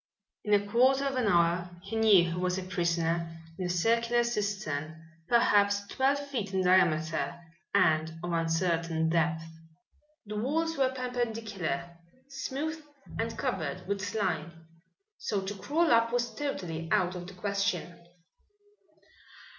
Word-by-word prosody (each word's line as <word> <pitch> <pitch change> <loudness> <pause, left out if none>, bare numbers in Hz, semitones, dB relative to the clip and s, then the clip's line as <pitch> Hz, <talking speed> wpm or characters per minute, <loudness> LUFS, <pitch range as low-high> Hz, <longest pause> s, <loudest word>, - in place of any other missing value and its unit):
In 210 -1 +4
a 205 0 +1
quarter 260 +5 +3
of 275 -1 -1
an 250 -4 +1
hour 175 -1 +2
he 225 - -6
knew 215 -5 +6
he - - -3
was 180 +1 0
a 190 - -3
prisoner 170 -2 -1 0.2
in 185 - -1
a - - -4
circular 230 +6 +2
cistern 190 -9 -2 0.3
perhaps 200 -4 +3
twelve 265 +6 +1
feet 250 -9 -4
in 190 - +2
diameter 165 -5 +2 0.4
and 160 -5 +3
of 175 - -3
uncertain 165 -1 0
depth. 160 -1 +1 0.8
The 210 0 -5
walls 325 +8 0
were 265 -3 +2
perpendicular, 225 - -3 0.3
smooth 280 +4 -4 0.4
and 230 0 -2
covered 160 -6 -3
with 200 0 -1
slime, 170 -6 -3 0.5
so 205 - -1
to 195 +1 -4
crawl 295 - +1
up 230 0 +4
was 240 0 0
totally 170 - -4
out 180 0 +2
of 175 -1 -7
the 195 - -10
question. 200 -2 -2
195 Hz, 135 wpm, -30 LUFS, 170-235 Hz, 0.8 s, knew